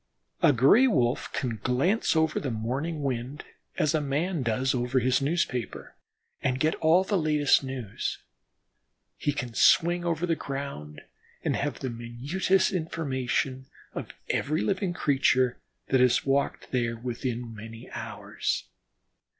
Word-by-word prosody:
A - - +6
Gray 145 - +6
wolf 125 - +1
can 120 -4 -2
glance 140 - +1
over 160 -1 +2
the 140 - -3
morning 135 +8 -3
wind 130 +2 -3 0.3
as 150 - +2
a 155 - +2
man 150 +4 -1
does 125 +2 +1
over 125 +1 0
his 130 +1 +3
newspaper, 135 - -2 0.5
and 130 -1 0
get 155 +3 +2
all 165 +4 +4
the 195 0 0
latest 150 -3 +3
news. 130 -6 -4 1.0
He 145 - -1
can 125 -4 -4
swing 175 +7 +4
over 170 0 0
the 165 -2 +1
ground 135 - -6 0.4
and - - +1
have 145 -2 -2
the 130 - -2
minutest 140 +12 0
information 135 -6 -2 0.3
of - - -5 0.2
every 155 +3 0
living 190 -2 0
creature 130 -5 +2 0.3
that 130 - +3
has 125 -1 +3
walked 140 +1 0
there 120 -2 0
within 120 0 -4
many 115 +1 -10
hours. - - -3
135 Hz, 135 wpm, -27 LUFS, 125-160 Hz, 1.0 s, A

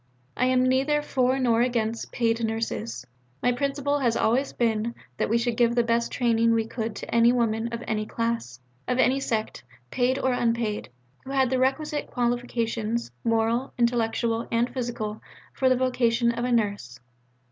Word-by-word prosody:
I 250 - +1
am 255 0 +3
neither 275 +3 +2
for 260 -2 +1
nor 235 -3 +2
against 230 -2 -1
'Paid 230 -1 0
Nurses.' 125 - -3 0.4
My 245 - +4
principle 280 +3 -1
has 240 -4 +1
always 255 +5 +1
been: 230 0 0 0.2
that - - 0
we 230 - +3
should 235 0 0
give 235 0 +3
the 240 - +3
best 235 0 0
training 230 -1 +2
we 225 -1 +1
could 225 -1 -4
to - - -7
any 235 0 +5
woman 230 -2 0
of 235 0 -5
any 215 -1 -1
class, 230 - -3 0.3
of 250 - 0
any 260 +1 +3
sect, 220 - -2 0.3
paid 255 +1 +1
or 260 -2 +1
unpaid, 230 - -1 0.3
who 265 - -11
had 265 -2 +2
the 260 - +1
requisite 295 +3 0
qualifications, 235 - -1
moral, 230 +3 +1
intellectual, 235 -1 0
and 235 +1 +1
physical, 235 -4 -4 0.3
for 260 - +2
the 255 - +3
vocation 240 -2 +2
of 235 +1 -3
a 250 - -1
Nurse. 200 - -1
235 Hz, 170 wpm, -26 LUFS, 225-255 Hz, 0.4 s, any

